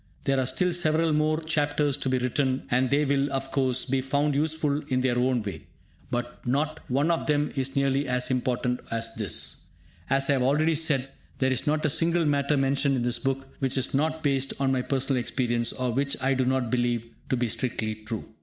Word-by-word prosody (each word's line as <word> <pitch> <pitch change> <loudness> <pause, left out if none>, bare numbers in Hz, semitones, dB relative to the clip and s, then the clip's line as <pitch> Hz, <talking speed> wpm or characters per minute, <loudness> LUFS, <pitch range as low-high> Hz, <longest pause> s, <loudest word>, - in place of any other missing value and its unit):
There 135 -1 +1
are 130 - 0
still 175 +7 +1
several 160 -1 +2
more 155 +1 +2
chapters 150 -2 +1
to 135 - -2
be 130 - +2
written, 130 +1 0
and 125 +1 +2
they 145 +2 +2
will, 140 0 +1
of 135 0 -3
course, 130 -2 +1
be 130 0 0
found 140 +2 0
useful 150 0 +1
in 130 -3 +1
their 125 -1 +1
own 125 -2 +1
way. 100 -2 -7 0.4
But 120 0 -4
not 150 +5 0
one 140 +6 +2
of 165 - -1
them 150 -1 +1
is 135 -1 -2
nearly 140 0 +1
as 125 0 0
important 125 -1 0
as 115 0 -2
this. 105 -6 -2 0.5
As 135 0 +2
I 145 - +3
have 135 - +1
already 150 +5 +3
said, 145 -4 +1 0.3
there 130 0 +1
is 130 +1 -1
not 155 +1 +1
a - - +3
single 165 +2 +2
matter 145 0 +2
mentioned 135 +1 +2
in 125 - -1
this 120 0 0
book 135 0 -2
which 135 -1 0
is 130 - 0
not 155 +3 0
based 135 -2 +1
on 135 -1 +2
my 130 -1 +1
personal 135 0 0
experience, 120 -1 0
or 125 -1 -2
which 140 +3 0
I 135 +1 +1
do 130 -1 +1
not 130 -2 0
believe 120 -2 0 0.2
to 130 - +1
be 120 0 0
strictly 110 -1 -2
true. 110 +1 -6
135 Hz, 210 wpm, -26 LUFS, 125-145 Hz, 0.5 s, I